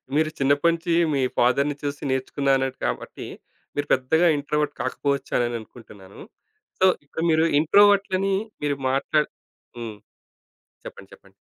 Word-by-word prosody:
మీరు 155 0 +2
చిన్నప్పటినుంచి 165 +5 +2 0.2
మీ 135 - +1 0.2
ఫాదర్‌ని 140 +4 +2
చూసి 145 0 -4
నేర్చుకున్నా 135 +1 -1
అన్నారు 135 0 -2
కాబట్టి - - -4 0.5
మీరు 145 0 -2
పెద్దగా 160 +7 +2
ఇంట్రోవర్ట్ 150 0 -1
కాకపోవచ్చ 140 +2 -2
అనే 120 -1 +1
అనుకుంటున్నాను. 105 -4 -14 0.6
సో, 190 - +5 0.2
ఇప్పుడు 160 +3 -5
మీరు 160 +1 +3
ఇంట్రోవర్ట్‌లని 195 +2 +4 0.3
మీరు 145 -1 0
మాట్లాడి 145 +3 +1 0.5
హ్మ్. 115 -3 -7 0.9
చెప్పండి, - - -11
చెప్పండి. - - -19
145 Hz, 120 wpm, -24 LUFS, 130-160 Hz, 0.9 s, సో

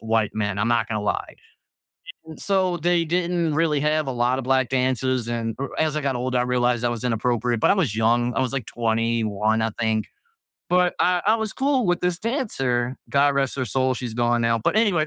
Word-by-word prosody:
white 110 -1 0
men. 100 -2 -2
I'm 110 - +1
not 120 -2 +1
gonna 105 -2 -2
lie. 105 - -2 0.9
E 160 - -9
so, 190 -3 0
they 170 +1 +1
didn't 170 -1 0
really 155 -2 +1
have 150 0 +1
a - - -1
lotta 125 +2 0
black 130 0 +1
dancers. 130 -1 0
And, 115 -1 -2
er, 140 - -3
as 155 -1 0
I - - 0
got 140 -3 -1
older, 125 +1 -1
I - - +2
realized 125 -1 +1
that 120 - +2
was 120 0 -5
inappropriate, 120 0 0
but - - +3
I - - +5
was 160 - 0
young. 120 +2 +2
I - - 0
was, 130 -1 -1
like, 135 -5 -3
21, 110 -2 0
I 110 - 0
think. 110 -1 0 0.6
But 180 0 +3
I 180 0 +3
I 215 - +5
was 220 -1 -3
cool 270 -2 +1
with 175 0 +1
this 180 -1 0
dancer. 135 - -1
God 140 0 +3
rest 135 -1 0
her 130 - -1
soul. 130 +3 +1
She's 120 -2 -5
gone 120 0 +1
now. 115 0 +2
But, 115 - 0
anyway, 195 -9 +2
130 Hz, 215 wpm, -23 LUFS, 115-160 Hz, 0.9 s, I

